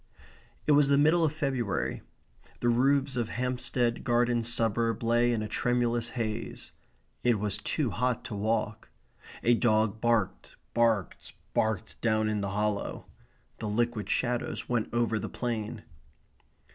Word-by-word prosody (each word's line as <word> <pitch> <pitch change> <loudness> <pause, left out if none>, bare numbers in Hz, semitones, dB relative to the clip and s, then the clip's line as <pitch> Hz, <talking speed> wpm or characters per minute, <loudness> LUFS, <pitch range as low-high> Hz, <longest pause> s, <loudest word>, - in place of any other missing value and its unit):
It - - +3
was 145 -1 +6
the 140 0 +4
middle 160 +4 +4
of 155 - +3
February. 135 - -2 0.6
The 120 - +1
roofs 135 +3 +2
of 120 -2 -1
Hampstead 125 -1 -1
Garden 120 -1 +2
Suburb 115 -1 0
lay 120 +1 +3
in 110 -2 0
a - - -3
tremulous 120 0 0
haze. 115 0 -4 0.5
It 120 -2 +3
was 105 0 -1
too 130 +2 -1
hot 125 +1 -1
to - - -5
walk. 110 +1 -1 0.5
A 120 - +5
dog 110 -2 +2
barked, 115 -5 0 0.2
barked, 115 -6 0 0.2
barked 110 -1 -1
down 110 -2 +2
in 105 -1 -1
the 100 - -2
hollow. 105 +1 -2 0.5
The 110 - -3
liquid 110 -2 -1
shadows 120 -1 -1
went 120 -3 -1
over 120 -2 +1
the - - -4
plain. 115 -2 -3
115 Hz, 140 wpm, -29 LUFS, 110-125 Hz, 0.6 s, was